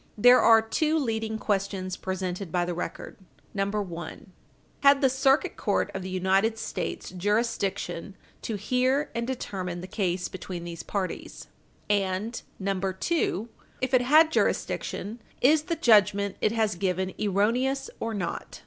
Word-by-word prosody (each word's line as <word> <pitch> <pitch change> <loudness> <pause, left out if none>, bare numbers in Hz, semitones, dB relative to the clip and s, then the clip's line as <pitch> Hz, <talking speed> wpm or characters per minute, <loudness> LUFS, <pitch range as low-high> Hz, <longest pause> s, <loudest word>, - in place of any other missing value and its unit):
There 245 +4 +7
are 225 -1 +6
two 310 +8 +1
leading 220 -5 -1
questions 195 -3 -1
presented 185 -1 -4
by 175 0 +1
the 175 - -2
record: 175 - -6 0.4
1. 195 - -4 0.5
Had 280 0 +6
the 265 -2 +3
Circuit 270 +2 +2
Court - - 0
of 190 - -4
the 185 - -6
United 190 +4 +1
States - - -4
jurisdiction 200 -2 -1 0.3
to 225 - -3
hear 255 +7 +1
and 235 0 -2
determine 185 -8 -4
the - - -6
case 185 -2 -1
between 180 -2 -7
these 170 -1 -6
parties? 195 -3 -5 0.4
And 205 +3 0 0.2
2. 195 - -1 0.3
If 255 +1 -2
it 255 - +6
had 310 +5 +5
jurisdiction, 225 -6 -1 0.2
is 295 +4 +5
the 335 - -1
judgment 200 -5 +4
it 215 - +3
has 220 -2 +1
given 185 +1 -1
erroneous 240 +7 +1
or 225 -1 -3
not? 180 -4 -4
205 Hz, 140 wpm, -27 LUFS, 185-245 Hz, 0.5 s, There